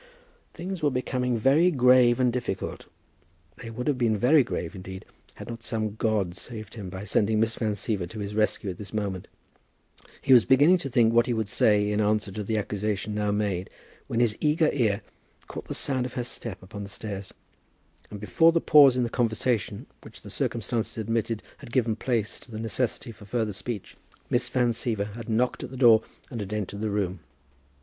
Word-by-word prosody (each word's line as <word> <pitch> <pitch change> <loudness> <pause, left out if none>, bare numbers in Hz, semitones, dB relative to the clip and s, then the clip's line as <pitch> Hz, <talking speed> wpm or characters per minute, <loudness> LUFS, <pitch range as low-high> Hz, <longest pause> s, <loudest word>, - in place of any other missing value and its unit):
Things 180 +1 -5
were 150 - +3
becoming 125 -1 -1
very 140 +10 +4
grave 125 -4 +5
and 125 -2 +3
difficult. 120 -6 -4 0.7
They 115 - -8
would 120 +2 -5
have 140 -4 0
been 115 -3 +2
very 135 +6 +5
grave, 90 -8 -4
indeed, 95 0 -8 0.3
had - - -9
not 115 -1 -7
some 110 -2 -2
god 105 -5 0
saved 110 +2 -8
him 100 -5 -7
by 95 +2 -7
sending 105 +1 +1
Miss 115 +1 +2
Van 110 -2 -1
Siever 95 -3 -2
to 110 - -9
his 100 0 -4
rescue 105 -2 0
at 90 - -11
this 105 0 -8
moment. 100 -4 -3 0.9
He 135 - +4
was 120 -3 +8
beginning 145 +8 +5
to 140 - -4
think 120 -3 +3
what 120 0 +4
he 120 - 0
would 110 -2 -1
say 105 0 +3
in 105 +1 +1
answer 105 -1 +1
to 105 +2 -4
the 110 +2 -1
accusation 105 0 -2
now 105 0 0
made, 100 -3 -1 0.4
when 115 - -1
his 115 -3 +2
eager 155 +1 +3
ear 110 -6 +1 0.4
caught - - -8
the - - -4
sound 130 -2 0
of - - -12
her 125 - -2
step 115 -5 -6
upon 100 +2 -8
the 100 - -7
stairs; 100 -1 -6 0.8
and 105 - -8
before 105 - +4
the 165 - +2
pause 140 -5 +7
in 125 - +2
the - - 0
conversation 115 -2 -1 0.2
which - - -13
the - - -10
circumstances 115 0 -2
admitted 115 0 -1 0.2
had - - -11
given 115 -3 +1
place 115 -2 -1
to - - -16
the 110 - -7
necessity 115 +1 -2
for 105 -1 -14
further 110 0 -1
speech, 105 +1 -5 0.3
Miss 120 0 +1
Van 125 -2 +2
Siever 110 -3 -2
had 115 0 -8
knocked 120 +3 0
at - - -6
the 130 - -8
door 115 -4 +7 0.3
and 120 - -5
had 100 0 -5
entered 100 -1 -4
the 110 - -1
room. 100 -3 -1
110 Hz, 200 wpm, -26 LUFS, 105-125 Hz, 0.9 s, was